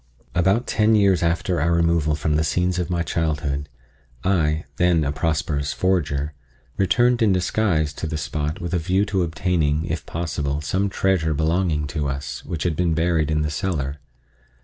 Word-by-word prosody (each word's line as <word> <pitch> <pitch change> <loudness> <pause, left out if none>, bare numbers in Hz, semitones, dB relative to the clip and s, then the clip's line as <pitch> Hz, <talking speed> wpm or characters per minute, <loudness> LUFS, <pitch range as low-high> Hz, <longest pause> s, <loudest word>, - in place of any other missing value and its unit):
About 95 +7 +2
ten 110 0 +3
years 100 -3 +4
after 85 0 0
our 85 +3 +2
removal 85 -2 +2
from 75 +1 0
the 80 - +2
scenes 90 +3 0
of 90 -1 -2
my 85 -1 0
childhood 75 -4 -2 0.5
I, 80 -4 +1
then 90 -3 +3
a 70 - 0
prosperous 75 -1 -1
forger, 75 -6 0 0.4
returned 120 +5 +2
in 110 -3 +4
disguise 90 -4 +1
to 80 - -5
the 80 0 -3
spot 75 +1 -3
with 85 +1 -4
a 90 - +2
view 95 +5 +1
to 100 -2 0
obtaining, 80 -2 0
if 80 0 -4
possible, 75 -4 -2
some 95 +7 0
treasure 90 -5 +1
belonging 80 0 +1
to 75 -2 -1
us, 70 -1 -5
which 80 - -4
had 85 -3 0
been 85 -1 +1
buried 80 -2 +1
in 75 0 +1
the 75 - -2
cellar. 75 -4 -2
80 Hz, 170 wpm, -22 LUFS, 75-90 Hz, 0.5 s, years